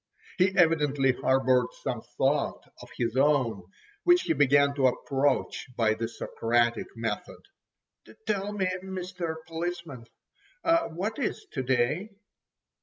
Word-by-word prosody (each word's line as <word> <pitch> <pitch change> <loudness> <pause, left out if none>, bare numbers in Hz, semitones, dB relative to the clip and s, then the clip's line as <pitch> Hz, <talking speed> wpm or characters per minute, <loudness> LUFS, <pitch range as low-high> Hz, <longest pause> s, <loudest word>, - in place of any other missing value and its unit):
He 185 +1 +5
evidently 150 -6 +3
harboured 130 -1 +2 0.2
some 125 -4 -2 0.2
thought 140 +2 +1 0.2
of - - -12
his 120 0 -1
own, 130 -7 +2 0.4
which 355 0 +5
he - - +1
began 140 0 +4
to 135 -2 +3
approach 135 +2 0
by 110 -2 +3
the 115 +1 -3
Socratic 120 +1 0
method. 115 -2 -4 0.8
"Tell 205 -1 -1
me, 205 -2 -1 0.2
Mr. 180 -3 -4
Policeman, 165 -6 -5 0.8
what 195 - -4
is 260 - -2
to 130 - -2
day?" 130 - 0
140 Hz, 115 wpm, -28 LUFS, 125-175 Hz, 0.8 s, He